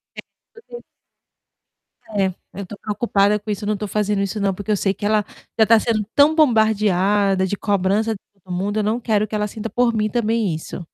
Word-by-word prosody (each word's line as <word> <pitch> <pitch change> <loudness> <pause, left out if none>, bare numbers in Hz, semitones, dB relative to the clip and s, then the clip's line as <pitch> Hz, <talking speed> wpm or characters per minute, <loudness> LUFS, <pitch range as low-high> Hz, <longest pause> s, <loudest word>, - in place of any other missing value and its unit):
É, - - -7 0.3
porque 475 +1 -12 1.3
É. 195 -3 0 0.2
Eu 200 - -6
tô 200 +3 -10
preocupada 210 -1 +1
com 210 - -11
isso, 205 0 -3
eu - - -3
não 215 0 0
tô 210 - -4
fazendo 210 0 0
isso 200 +2 -2
não, 200 -1 +1
porque 205 +3 -5
eu - - +3
sei 195 0 0
que 205 +2 -6
ela 210 0 +2 0.3
já 220 - +5
tá 225 0 +5
sendo 215 -1 0
tão 290 +2 +5
bombardeada 205 - +3
de 205 - -2
cobrança 200 +2 0
de 205 - -9 0.2
todo 185 - -7
mundo, 200 +4 -2
eu - - 0
não 215 +3 0
quero 215 -3 +1
que 215 - -15
ela 210 0 0
sinta, 220 +2 -6
por 245 0 +1
mim, 215 -1 0
também 225 -4 0
isso. 160 +2 -7
210 Hz, 215 wpm, -20 LUFS, 200-220 Hz, 1.3 s, já